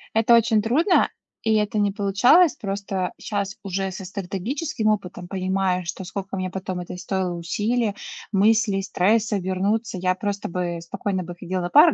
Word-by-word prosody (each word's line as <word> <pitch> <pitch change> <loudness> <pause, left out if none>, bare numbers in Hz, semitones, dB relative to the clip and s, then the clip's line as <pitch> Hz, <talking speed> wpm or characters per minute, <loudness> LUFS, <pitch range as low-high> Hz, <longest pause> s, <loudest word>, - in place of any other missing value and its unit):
Это 225 +1 +5
очень 225 -2 +4
трудно, 310 - +3 0.3
и 220 -1 +2
это 210 0 +1
не 205 -1 +2
получалось. 210 - +4
Просто 195 -2 -3
щас 200 0 -3
уже 195 0 -2
со 190 +1 -7
стратегическим 215 - -3
опытом 190 -4 -1
понимаю, 185 -1 0
что 175 - -5
сколько 195 +1 -5
мне 185 0 -2
потом 185 -1 -4
это 180 +1 -7
стоило 185 0 -2
усилий, 210 +6 -1 0.4
мыслей, 205 0 +3
стресса 210 +3 +2
вернуться, 195 +3 -1
я 185 0 +1
просто 205 0 -3
бы 175 -1 -2
спокойно 185 +2 -3
бы 175 0 -8
ходила 185 +1 -3
на 175 - -2
пары, 305 - +7
195 Hz, 160 wpm, -23 LUFS, 185-220 Hz, 0.4 s, пары